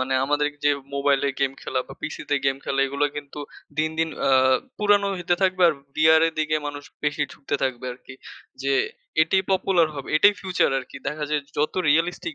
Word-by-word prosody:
মানে 130 +1 -1
আমাদের 145 +1 +1 0.2
যে 145 - +5 0.2
মোবাইলে 140 0 +2
গেম 135 -1 +1
খেলা 130 - -1
বা - - -9
পিসি 155 - -5
তে - - +4
গেম 135 0 +2
খেলা 135 0 0
এইগুলা 140 +2 0
কিন্তু 145 0 -8 0.4
দিন, 155 0 +1
দিন 165 0 +1 0.2
আ - - +4 0.5
পুরানো 205 -1 +3
হইতে 175 0 0
থাকবে 185 -1 +2
আর 155 - +1 0.2
বিয়ার 160 +1 +5
এর 165 - -2
দিকে 155 0 +1
মানুষ 145 0 -6 0.2
বেশি 150 0 0
ঢুকতে 140 - -5
থাকবে 130 -2 -2
আরকি। 130 +1 -13 0.5
যে 135 0 +1 0.5
এটিই 190 +4 +1
পপুলার 185 -3 +3
হবে। 140 - -7
এটাই 205 +5 +6
ফিউচার 185 -6 +1
আরকি। 130 +1 -9
দেখা 150 0 -3
যায় 150 -1 +1 0.2
যত 150 +1 +1 0.2
রিয়ালিস্টিক 175 - +1
150 Hz, 190 wpm, -24 LUFS, 140-170 Hz, 0.5 s, এটাই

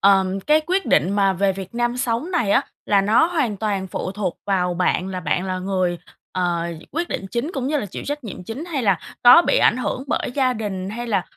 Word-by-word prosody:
ờm, 195 -1 +3
cái 300 +9 +3
quyết 375 +2 0
định 155 +5 +3
mà 200 -1 +2
về 195 +1 +1
Việt 190 +2 -8
Nam 240 0 0
sống 250 +5 -1
này 285 - 0
á, - - +4 0.2
là 200 -1 +4
nó 215 +11 +4
hoàn 290 - -1
toàn 200 -2 -2
phụ 185 0 -4
thuộc 195 -4 -3
vào 180 -3 +1
bạn, 180 +1 0
là 185 -1 -4
bạn 170 +2 -1
là 185 -1 -2
người, 185 -2 -1 0.3
ờ, 175 -2 0 0.3
quyết 335 +4 -2
định 195 - -4
chính 245 +7 -2
cũng 265 -3 -2
như 300 +2 0
là 250 - -3
chịu 190 - -7
trách 290 -1 -4
nhiệm 185 -4 -7
chính, 235 - -6
hay 315 -7 -3
là 195 -5 +3 0.3
có 285 +8 +9
bị - - +3
ảnh - - +4
hưởng 255 +1 -3
bởi - - -1
gia 260 -3 +2
đình 200 -4 -4
hay 240 +3 -5
là, 200 -5 +1
205 Hz, 240 wpm, -22 LUFS, 185-255 Hz, 0.3 s, có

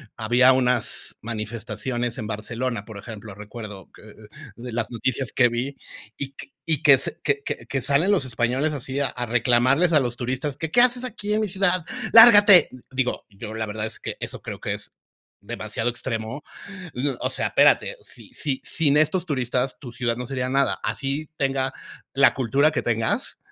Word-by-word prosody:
había 125 +4 +4
unas 125 -2 0
manifestaciones 115 +2 -4
en 110 - -4
Barcelona, 115 +1 -4
por 110 -3 -10
ejemplo, 105 -1 -9
recuerdo 105 -2 -9
que, - - -16
eh, - - -13
eh, - - -15 0.3
de 120 0 -7
las 115 0 -2
noticias 125 +1 -1
que 125 -2 +5
vi, 125 +4 -3 0.4
y 140 -1 -5 0.5
que, 140 -3 +8 0.3
que, 140 -1 0 0.2
que 135 -2 -2
salen 155 +8 +2
los 175 -10 +2
españoles 125 +5 0
así 135 0 -4
a, 140 - +2
a 125 -1 -4
reclamarles 125 +8 +3
a 150 - +6
los 120 -2 -2
turistas 130 +3 -3
que: 160 - -3
"¿Qué 240 - +5
haces 250 0 +3
aquí 210 -4 -3
en 215 - +1
mi 215 - 0
ciudad? 185 -2 +1 0.3
¡Lárgate!". 205 -5 +9 0.2
Digo, 130 -1 -2
yo 105 +2 -9
la 110 0 -2
verdad 105 +1 -4
es - - -9
que - - -5
eso - - -6
creo - - -7
que - - -3
es - - -11 0.5
demasiado 120 +2 -3
extremo. 120 +2 -4 0.5
Y, 130 +4 -2
o - - -1
sea, - - -1
espérate, - - +3
si - - -13
si 140 -3 -2
sin 150 -3 +2
estos 160 +4 +2
turistas 130 -2 -1
tu 125 -4 -9
ciudad 120 -1 -1
no 125 -1 -5
sería 130 -2 -2
nada, 135 +1 +2
así 140 +3 -3
tenga 135 -1 0 0.4
la 140 +1 +5
cultura 135 +4 +2
que - - -1
tengas, 115 -1 -1
130 Hz, 180 wpm, -23 LUFS, 115-145 Hz, 0.5 s, Lárgate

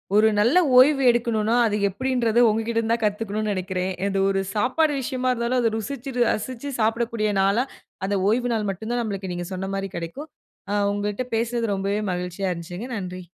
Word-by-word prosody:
ஒரு 215 +1 +6
நல்ல 240 +12 +4 0.2
ஓய்வு 275 +2 +6
எடுக்கணும்னா, 230 -1 0
அது 210 - -1
எப்டின்றது 240 +1 0
உங்ககிட்ட 225 +2 -1
இருந்து 230 0 +1
தான் 230 -1 -1
கத்துக்கணும்னு 210 0 -1
நெனைக்கிறேன். 185 0 -2 0.2
இது 195 -1 0
ஒரு 195 0 +1
சாப்பாடு 290 +7 +2
விஷயமா 255 0 -1
இருந்தாலும், 240 +1 0
அதை 230 -2 +2
ருசிச்சு, 265 +4 -5 0.2
ரசிச்சு 255 +5 -4
சாப்பிடக்கூடிய 225 -1 0
நாளா, 200 +6 +3 0.4
அந்த 200 0 0
ஓய்வு 245 +2 +1
நாள் 215 -2 -1
மட்டும்தான் 225 +5 -3
நம்மளுக்கு 195 -3 -4
நீங்கச் 175 +1 -5
சொன்ன 190 +1 -4
மாரி 195 0 -3
கெடைக்கும். 220 - -6 0.4
அ - - +1 0.2
உங்கட்ட 205 +4 -2
பேசறது 230 +1 0
ரொம்பவே 200 +2 -1
மகிழ்ச்சியா 180 +2 -3
இருந்துச்சுங்க. 175 +7 -6
நன்றி! 185 -1 -6
220 Hz, 165 wpm, -24 LUFS, 195-240 Hz, 0.4 s, ஒரு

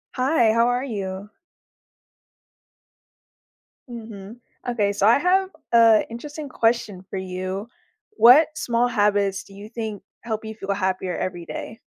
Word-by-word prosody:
Hi, 255 -4 +3
how 230 +1 +3
are 245 +1 0
you? 200 -4 -5 2.6
Mhm. 220 -2 -9 0.3
Okay, 210 -4 0
so 200 0 0
I 230 - +6
have 375 +3 +2 0.2
a 230 -2 +6
interesting 290 +6 -7
question 225 -6 0
for - - -5
you: 185 +2 -4 0.4
what 300 - +7
small 240 0 +1
habits 205 -4 +1
do 195 - -17
you 200 +2 -10
think 220 -3 -5 0.2
help 220 -1 -4
you 220 0 -7
feel 200 -2 -3
happier 185 -2 -2
every 175 -2 -4
day? 225 +6 -7
220 Hz, 130 wpm, -23 LUFS, 195-240 Hz, 2.6 s, what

